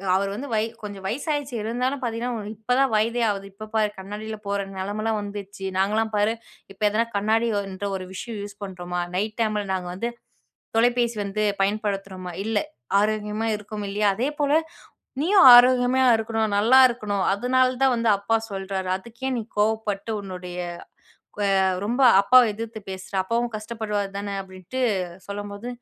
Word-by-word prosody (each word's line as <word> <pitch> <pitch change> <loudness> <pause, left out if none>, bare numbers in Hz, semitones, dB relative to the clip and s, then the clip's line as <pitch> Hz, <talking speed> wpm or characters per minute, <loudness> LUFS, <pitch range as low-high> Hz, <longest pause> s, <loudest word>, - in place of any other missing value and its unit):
அவர் 195 +1 +1
வந்து 280 +5 -5
வய 215 0 +2 0.2
கொஞ்ச 205 -1 -6
வயசாயிடுச்சு. 285 +2 -2
இருந்தாலும் 250 +5 -1
பார்த்தீங்கன்னா, 240 +1 -2
உனக்கு 210 0 -7
இப்பதான் 250 +4 +2
வயதே 230 +2 +1
ஆகுது. 195 -1 -3
இப்ப 215 +2 -9
பார் 210 -1 +1
கண்ணாடில்லாம் 210 +2 -7
போற 200 0 0 0.2
நெலமைல்லாம் 210 +3 -2
வந்துச்சு. 200 -1 -7
நாங்கல்லாம் 215 +3 +1
பாரு, 210 +2 +2 0.4
இப்ப 195 - -31
எதனா 220 +3 +1
கண்ணாடி 220 +3 +2
ஒ - - -1
இன்ற 200 +2 -4
ஒரு 185 -1 -8
விஷயம் 220 +2 -6
யூஸ் 205 0 -10
பண்ணுறோமா? 180 -2 -4
நைட் 215 +4 -2
டைமில 215 -2 0
நாங்க 180 -1 -3
வந்து 235 +5 -2 0.7
தொலைபேசி 240 0 +2
வந்து 200 +2 -2 0.2
பயன்படுத்துறோமா? 195 -3 -2
இல்லை. 220 -2 +1 0.4
ஆரோக்கியமா 210 +1 -1
இருக்கோம் 210 0 -6
இல்லையா? 205 +1 +1
அதேபோல 285 +5 0 0.7
நீயும் 370 0 +5
ஆரோக்கியமா 250 +1 +5
இருக்கணும், 220 -1 -1
நல்லா 235 +6 +6
இருக்கணும். 210 -5 -2
அதனால 255 +4 +2
தான் 265 -1 +5
வந்து 230 -1 +1
அப்பா 215 +3 0 0.2
சொல்றாரு. 190 -1 -3
அதுக்கேன் 240 +5 -5
நீ - - -1 0.2
கோவப்பட்டு 215 0 0
உன்னுடைய 180 -2 -7 0.8
க் - - -9
வ 205 - +2 0.4
ரொம்ப 245 +5 0 0.2
அப்பாவ 250 +3 +6
எதிர்த்து 225 +1 -6
பேசுற. 190 +1 -8
அப்பாவும் 235 +4 -1
கஷ்டப்படுவாரு 215 -2 -3
தான." 200 0 -4
அப்படீன்ட்டு 185 +5 -8 0.5
சொல்லும்போது 205 +2 -6
215 Hz, 150 wpm, -24 LUFS, 200-235 Hz, 0.8 s, நல்லா